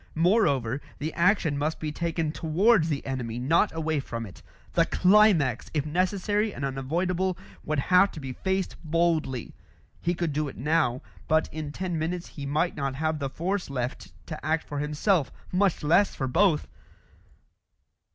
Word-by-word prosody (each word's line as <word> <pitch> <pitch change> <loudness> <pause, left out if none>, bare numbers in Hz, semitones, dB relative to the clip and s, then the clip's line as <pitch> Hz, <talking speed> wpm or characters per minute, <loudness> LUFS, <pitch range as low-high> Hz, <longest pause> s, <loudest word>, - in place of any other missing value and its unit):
Moreover, 145 - +2 0.2
the 155 +2 -4
action 170 -5 +2
must 155 +2 -1
be 155 -1 -3
taken 165 0 -2
towards 170 +3 +3
the 145 -3 -2
enemy, 125 -4 -3
not 160 +11 +2
away 160 -2 -1
from 115 -4 -5
it; 95 - -12 0.3
the - - +3
climax, 180 - +4
if 145 -1 +1
necessary 195 +6 0
and 140 - -4
unavoidable, 170 +7 -1 0.3
would 155 0 -1
have 180 +7 +4
to - - -7
be 135 -2 -6
faced 190 +5 -2
boldly. 160 -6 0 0.5
He 175 +1 0
could 170 -3 -2
do 150 +1 0
it 135 - -8
now; 130 -3 +1 0.2
but 155 +1 +2
in 155 -2 -4
ten 175 0 -3
minutes 170 +2 -3
he 140 -2 -7
might 155 +5 0
not 135 -2 -2
have 155 +1 -1
the 140 -1 -2
force 180 +6 -2
left 125 -2 -4
to 155 - -7
act 160 +1 0
for 145 - -4
himself, 150 +2 +1 0.2
much 185 -2 +1
less 170 +7 +3
for 135 - -2
both! 165 +3 +2
155 Hz, 160 wpm, -27 LUFS, 140-180 Hz, 0.5 s, climax